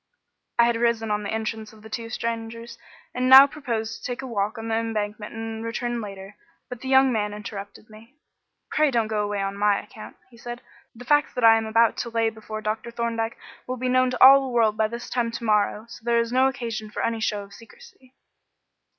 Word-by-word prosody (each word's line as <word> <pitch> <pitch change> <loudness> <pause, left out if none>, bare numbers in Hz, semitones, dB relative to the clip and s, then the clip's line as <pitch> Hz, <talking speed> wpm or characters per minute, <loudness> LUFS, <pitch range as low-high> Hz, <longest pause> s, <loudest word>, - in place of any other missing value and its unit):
I 235 - +6
had 235 -1 +1
risen 230 -2 0
on 210 0 0
the 205 - -5
entrance 220 0 -4
of 215 -1 -17
the 220 - -11
two 230 +1 -5
strangers, 230 0 -5 0.4
and 255 +1 0
now 265 +1 +11
proposed 235 -6 -4
to - - -22
take 245 +2 -5
a - - -5
walk 215 -3 -2
on 225 0 -6
the 225 - -2
Embankment 215 -2 -3
and 225 0 -5
return 240 +1 -3
later, 195 0 -9 0.3
but 250 -1 -8
the 265 - -7
young 265 0 +5
man 210 -2 -1
interrupted 205 0 -9
me. 225 +5 -16 0.6
"Pray 305 -1 +3
don't 230 -4 0
go 215 -1 0
away 205 -1 -2
on 195 0 -3
my 205 0 +2
account," 215 - -12
he 235 - -17
said. 240 +1 -8 0.3
"The 245 +2 -11
facts 295 +2 +2
that 250 - -2
I 225 0 +8
am 225 0 -1
about 225 +1 +3
to 235 - -3
lay 225 -1 0
before 215 0 -8
Dr. 215 +2 -3
Thorndyke 230 -1 -3 0.3
will 255 0 -3
be 255 +1 -2
known 255 0 +3
to 250 0 +2
all 275 +1 +9
the 265 -1 -4
world 225 -3 +2
by 215 0 +1
this 235 +2 -7
time 240 -2 -1
to 235 - -6
morrow, 210 0 +1
so 235 - -12
there 235 0 +1
is 230 +1 0
no 260 +1 +4
occasion 230 -5 -4
for - - -4
any 230 -1 -1
show 210 -2 -1
of 200 0 -15
secrecy." 260 - -17
230 Hz, 225 wpm, -24 LUFS, 215-240 Hz, 0.6 s, now